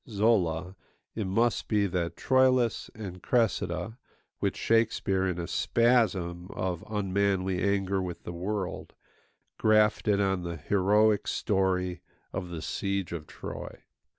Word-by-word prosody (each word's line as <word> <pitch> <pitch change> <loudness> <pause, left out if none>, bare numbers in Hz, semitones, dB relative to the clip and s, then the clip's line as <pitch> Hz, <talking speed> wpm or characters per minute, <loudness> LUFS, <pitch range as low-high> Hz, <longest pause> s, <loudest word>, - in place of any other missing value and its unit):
Zola, 95 -5 +1 0.4
it 110 -4 -3
must 115 +5 +1
be 105 -2 +2
that 90 -3 -2
Troilus 130 -2 +2
and 95 -5 -7
Cressida 105 -3 0 0.4
which - - -1
Shakespeare, 105 -4 +1
in 90 -2 -2
a 85 - -3
spasm 95 -9 +1
of 90 -2 -2
unmanly 95 -2 0
anger 100 -1 +1
with 90 -2 -6
the 85 - -6
world, 95 +2 -4 0.7
grafted 105 -1 +3
on 95 -2 +1
the 85 -1 -5
heroic 105 +4 +2
story 90 -3 0 0.3
of 90 -1 -4
the 85 -2 -6
siege 100 -2 -2
of 80 -2 -6
Troy. - - -8
95 Hz, 125 wpm, -28 LUFS, 90-110 Hz, 0.7 s, grafted